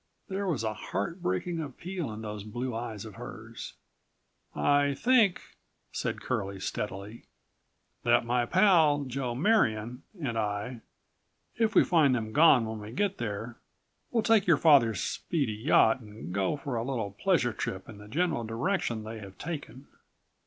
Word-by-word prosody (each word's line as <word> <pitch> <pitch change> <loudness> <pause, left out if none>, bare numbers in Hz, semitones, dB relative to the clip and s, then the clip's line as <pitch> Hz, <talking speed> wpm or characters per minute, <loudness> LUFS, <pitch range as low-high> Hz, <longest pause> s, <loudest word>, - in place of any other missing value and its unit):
There 195 +1 -2
was 150 -10 -1
a 110 -1 -1
heartbreaking 165 - -3
appeal 165 +1 -5
in 110 +1 -7
those 105 -1 -5
blue 120 +4 -4
eyes 115 -3 -5
of 110 - -9
hers. 115 0 -9 0.8
"I 145 -1 +3
think," 230 - +3 0.5
said - - -3
Curlie 100 0 -3
steadily, 100 +3 -5 0.8
"that 120 0 +3
my 120 0 +1
pal, 165 - +4
Joe 130 -2 -3
Marion, 125 - +1 0.2
and 120 -7 -2
I, 105 +3 -3 0.8
if 225 -1 +1
we - - +8
find 155 -7 +4
them 110 -2 -3
gone 145 -6 +6
when 110 0 -5
we 105 +1 -8
get 200 - -1
there, 115 +1 -4 0.5
will 230 -2 +1
take 220 -4 +4
your 165 -4 +6
father's 130 - +5
speedy 140 -10 -1
yacht 115 +1 +4
and 105 -5 -9
go 100 +8 0
for 140 -4 -4
a 115 - -1
little 115 -6 -2
pleasure 125 - +1
trip 95 -2 -4
in 110 -3 -11
the 105 - -12
general 150 0 0
direction 115 - -1
they 110 +1 -7
have 100 -2 -11
taken. 140 -5 -6
120 Hz, 150 wpm, -29 LUFS, 110-160 Hz, 0.8 s, we